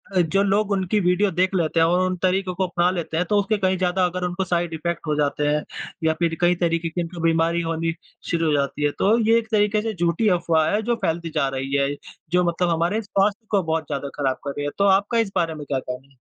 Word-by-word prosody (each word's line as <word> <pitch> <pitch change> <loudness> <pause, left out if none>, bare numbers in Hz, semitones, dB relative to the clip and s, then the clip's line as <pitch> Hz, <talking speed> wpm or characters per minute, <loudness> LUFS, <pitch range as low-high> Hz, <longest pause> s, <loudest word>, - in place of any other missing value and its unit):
अ, - - +4
जो 175 +4 +1
लोग 200 +1 +1
उनकी 195 +1 +1
वीडियो 180 +2 +2
देख 185 +2 +1
लेते 165 -2 +1
हैं 165 - +5
और 175 +2 +2
उन 185 - -1
तरीकों 185 0 +1
को 190 - 0
अपना 175 0 +1
लेते 170 -3 -3
हैं 175 - +1
तो 210 - +3
उससे 205 +2 0
कहीं 190 -1 +1
ज़्यादा 180 0 +1
अगर 180 +1 -3
उनको 180 +2 -2
साइड 175 -2 -1
इफेक्ट 170 +1 -4
हो 150 - +1
जाते 145 0 0
हैं 150 0 +1 0.4
या 160 0 +3
फिर 170 -1 +1
कई 175 0 +4
तरीके 170 -1 0
की 175 +2 -2 0.2
बीमारी 165 +1 +2
होनी 165 0 -2 0.4
शुरू 165 -1 0
हो 155 - +2
जाती 140 +1 -1
है 145 - +2
तो 215 +4 +4
ये 225 +1 +5
एक 230 -1 -2
तरीके 210 0 +2
से 225 0 -3
झूठी 175 +3 0
अफ़वाह 160 -2 +2
हैं 210 - +1
जो - - +3
फैलती 165 +1 -1
जा 145 -3 +2
रही 135 +1 -4
है 140 0 +2 0.4
जो 180 0 +3
मतलब 175 +1 0
हमारे 170 +6 0
स्वास्थ्य 205 0 0
बहुत 160 -2 -1
ज़्यादा 140 -1 -4
ख़राब 135 -2 0
कर 140 - -3
रही 145 - -2
है, 145 - -2
तो 200 - +2
आपका 200 +4 +3
इस 220 -4 0
बारे 165 -1 +1
में 150 -1 -8
क्या 135 -1 -1
कहना 125 +1 -7
है? 135 - -28
175 Hz, 250 wpm, -23 LUFS, 160-195 Hz, 0.4 s, हैं